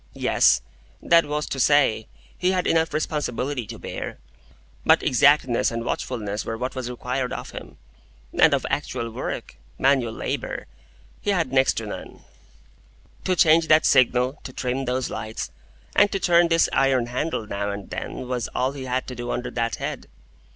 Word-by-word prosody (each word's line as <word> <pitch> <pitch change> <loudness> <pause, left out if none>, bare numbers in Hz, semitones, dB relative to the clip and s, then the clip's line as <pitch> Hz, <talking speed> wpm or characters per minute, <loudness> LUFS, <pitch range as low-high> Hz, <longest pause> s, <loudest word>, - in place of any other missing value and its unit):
Yes; - - +3 0.4
that 170 -1 +4
was 150 +1 -2
to 135 - -4
say, 130 -5 +3 0.3
he 185 +1 +1
had 180 -1 0
enough 160 0 +2
responsibility 145 -5 -2
to - - -7
bear; - - -6 0.7
but - - +4
exactness 130 -1 +4
and 115 0 -4
watchfulness 105 -5 -3
were 115 - -4
what 125 +2 -3
was 130 -2 -4
required 125 +1 -3
of - - -6
him, - - -10 0.6
and - - +5
of - - -3
actual 115 -1 -2
work—manual 130 +2 -1
labour—he 205 - -6
had 165 -9 +1
next 130 0 +4
to 115 - -3
none. 105 - -8 1.0
To 185 - +2
change 165 -1 +5
that 155 0 +5
signal, 130 +2 +3
to - - -7
trim 130 +1 -2
those 125 0 -1
lights, 110 0 -5 0.4
and 205 0 +5
to 195 - -1
turn 175 -1 +4
this 165 0 +3
iron 135 -3 +3
handle 125 0 -2
now 100 0 -3
and 100 -1 -6
then, 125 - -5
was 125 -2 -2
all 130 +1 +1
he 135 -2 -7
had 130 0 -1
to 130 - -7
do 120 0 -6
under 125 0 -3
that 115 -1 -1
head. - - -5
130 Hz, 165 wpm, -24 LUFS, 120-150 Hz, 1.0 s, and